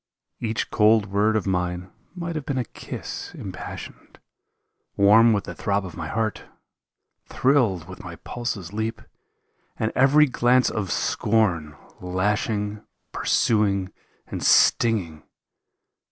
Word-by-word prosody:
Each 110 -1 -2
cold 110 -1 +4
word 105 +2 +2
of 110 - 0
mine 90 -1 -2 0.2
might 170 -2 -4
have 155 - -3
been 140 -1 -3
a 125 - -1
kiss - - -8
im - - -6
passioned, - - -9 0.8
Warm 110 +4 +6
with 105 -3 +1
the - - -7
throb 100 -1 -1
of 90 - -9
my 80 -2 -5
heart, 110 +3 -2 0.8
thrilled 115 - +1
with 95 - -10
my 85 -2 -8
pulse's 105 -4 -5
leap, 110 +1 -3 0.7
And 110 - -1
every 140 +3 +5
glance 125 -1 +2
of 100 -6 -3
scorn, 90 -9 0 0.2
lashing, 105 +3 -1 0.3
pursuing, 100 -4 +1 0.3
and - - -6
stinging. 95 -10 +3
105 Hz, 125 wpm, -24 LUFS, 95-115 Hz, 0.8 s, Warm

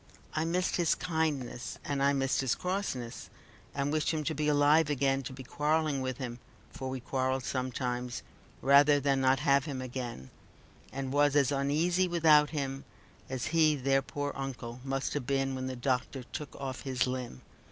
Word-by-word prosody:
I 155 - 0
missed 180 +2 0
his 175 -2 +3
kindness, 145 -8 -2
and 140 -1 -1
I 140 +1 +4
missed 135 -1 +1
his 130 -3 +1
crossness, 180 -11 -3 0.5
and 140 +1 0
wished 155 -1 +1
him 155 -2 0
to - - -1
be 150 +1 -1
alive 150 +1 +4
again, 135 -1 +1
to 130 - -7
be 130 0 -8
quarrelling 150 +1 0
with 130 -1 -3
him 125 -3 -5 0.3
(for 130 - -5
we 130 0 -3
quarreled 130 +1 -1
sometimes), 125 -1 -3 0.4
rather 145 +1 +6
than 135 -1 +1
not 130 0 +3
have 140 0 +3
him 140 -4 -4
again, 125 - -6 0.6
and 135 0 -4
was 145 0 +3
as 140 -2 +4
uneasy 155 +7 +2
without 155 -4 +5
him, 135 -3 -3 0.5
as 130 -2 -3
he 155 -2 +5
their 135 0 +2
poor 145 +1 -4
uncle 125 -3 -6
must 135 0 -2
have 140 -4 -3
been 135 -1 +1
when 130 0 -3
the 130 - -4
doctor 125 +1 -1
took 145 +4 -7
off 130 -2 -5
his 130 -2 0
limb. 125 - -5
135 Hz, 175 wpm, -31 LUFS, 130-150 Hz, 0.6 s, rather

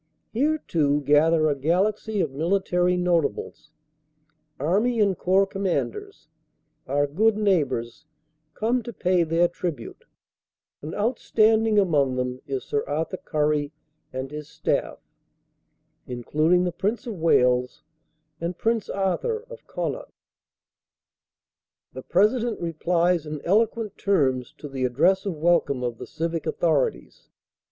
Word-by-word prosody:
Here, 295 +7 +2
too, 150 - 0
gather 155 +3 +4
a 150 - +2
galaxy 195 +8 0
of 155 - -1
military 180 +3 +1
not 175 -2 +2
ables; 150 - -6 0.9
Army 210 - +1
and 200 -3 +3
Corps 190 +3 +3
Commanders, 200 - -3 0.6
our 145 +2 +1
good 205 +9 +2
neighbors, 150 - 0 0.5
come 235 +3 0
to 235 +1 -8
pay 180 -1 +1
their 165 +2 +2
tribute; 170 -8 -6 0.8
and 155 +2 -6
outstanding 220 -1 +2
among 145 -9 +2
them 125 0 -3
is 135 -2 -3
Sir 145 - -1
Arthur 160 +5 -2
Currie 150 -2 -1 0.4
and 130 +1 -5
his 150 0 -7
staff, - - -1 1.1
including 155 +8 +1
the 180 - 0
Prince 205 +6 -2
of 220 -7 -6
Wales 125 -6 +2 0.6
and 170 +1 -4
Prince 225 -1 0
Arthur 445 - -1
of - - -11
Connaught. - - -4 1.8
The - - -7
President 220 +4 +1
replies 170 0 0
in 150 0 -5
eloquent 220 +3 +1
terms 135 -11 +1
to 150 - -8
the 135 -2 -4
address 170 +11 +2
of 185 - -2
welcome 150 -5 +1
of 120 -2 -3
the - - -7
civic 165 0 -3
authorities. 155 -6 -1
170 Hz, 125 wpm, -24 LUFS, 145-205 Hz, 1.8 s, gather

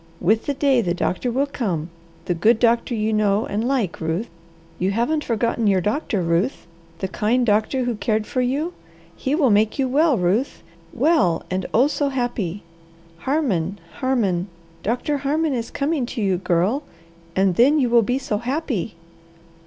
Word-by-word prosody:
With 215 +5 +1
the 285 - 0
day 270 -3 +3
the 175 -4 -1
doctor 185 +6 -1
will 265 +4 +1
come, 180 - -3 0.3
the 180 - 0
good 215 +7 +3
doctor 235 +1 +2
you 220 0 0
know 210 0 +2
and 210 +2 -2
like, 245 -12 -1
Ruth. 160 +7 -2 0.5
You 185 - +1
haven't 240 +9 0
forgotten 230 -1 0
your 195 -2 +4
doctor, 210 - -1
Ruth? 170 +10 0 0.3
The 190 - -3
kind 230 +6 +1
doctor 220 +4 +1
who 245 -1 -1
cared 215 0 -1
for 255 - -1
you. 285 +8 -1 0.4
He 270 +3 -1
will 280 -7 +3
make 210 +1 +2
you 270 -2 +1
well, 290 +1 +3
Ruth; 195 +9 0 0.3
well 250 - +2
and 185 0 -1
oh, 245 +4 +4
so 290 -1 0
happy! 235 -8 -2 0.6
Harmon, 205 - 0 0.2
Harmon, 205 -9 0 0.3
Doctor 250 +6 -1
Harmon 295 +2 0
is 230 -2 -3
coming 280 -3 -1
to 235 - -4
you, 190 -2 +2
Girl, 190 - +1 0.5
and 190 -1 +2
then 275 - +5
you 265 -4 +3
will 235 0 +5
be 245 +4 0
so 240 -6 -2
happy!" 245 - -2
230 Hz, 170 wpm, -22 LUFS, 195-270 Hz, 0.6 s, then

